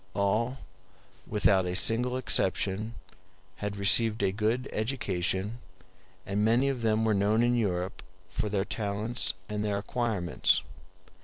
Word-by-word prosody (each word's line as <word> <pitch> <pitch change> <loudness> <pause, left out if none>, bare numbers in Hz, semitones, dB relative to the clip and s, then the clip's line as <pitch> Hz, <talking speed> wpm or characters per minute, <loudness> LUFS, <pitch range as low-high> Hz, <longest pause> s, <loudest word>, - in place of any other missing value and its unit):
All, 110 +6 0 0.7
without 100 -3 +2
a 90 - -2
single 120 +6 +2
exception, 105 -2 +1 0.6
had 105 0 -4
received 105 +2 +3
a 95 - +2
good 110 +6 -1
education, 105 -2 -2 0.7
and 100 +2 -1
many 120 +5 +3
of 130 -3 -3
them 110 0 +1
were 110 - +3
known 105 +3 +2
in 120 0 +3
Europe 95 -4 -1 0.3
for 95 +3 -3
their 100 -1 0
talents 105 +3 -1
and 105 0 -3
their 105 -1 0
acquirements. 100 -6 0
105 Hz, 130 wpm, -29 LUFS, 100-115 Hz, 0.7 s, received